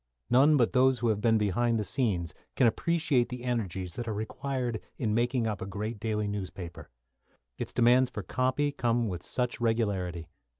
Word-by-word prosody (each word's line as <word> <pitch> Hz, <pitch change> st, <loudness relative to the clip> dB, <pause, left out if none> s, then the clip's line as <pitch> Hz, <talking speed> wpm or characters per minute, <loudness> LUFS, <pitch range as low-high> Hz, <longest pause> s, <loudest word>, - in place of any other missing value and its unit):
None 140 Hz, +5 st, +6 dB
but 120 Hz, -4 st, +2 dB
those 130 Hz, 0 st, +4 dB
who 120 Hz, 0 st, 0 dB
have 105 Hz, -1 st, 0 dB
been 115 Hz, 0 st, +4 dB
behind 115 Hz, +3 st, +1 dB
the 105 Hz, -, 0 dB
scenes 95 Hz, -, -1 dB, 0.2 s
can 130 Hz, -, +4 dB
appreciate 155 Hz, 0 st, +2 dB
the 125 Hz, -1 st, -6 dB
energies 95 Hz, -8 st, -2 dB
that 120 Hz, +4 st, -5 dB
are 110 Hz, -, -1 dB
required 120 Hz, +1 st, -3 dB, 0.2 s
in 110 Hz, -4 st, -1 dB
making 120 Hz, +1 st, +1 dB
up 105 Hz, -2 st, -2 dB
a 95 Hz, -, -4 dB
great 105 Hz, +3 st, -4 dB
daily 105 Hz, -1 st, -1 dB
newspaper. 90 Hz, -6 st, -6 dB, 0.7 s
Its -, -, -4 dB
demands 125 Hz, +1 st, +4 dB
for -, -, -6 dB
"copy" 130 Hz, +3 st, 0 dB
come 120 Hz, -3 st, 0 dB
with 90 Hz, -4 st, -4 dB
such 125 Hz, -1 st, -3 dB
regularity. 100 Hz, -8 st, -1 dB
115 Hz, 175 wpm, -29 LUFS, 105-125 Hz, 0.7 s, None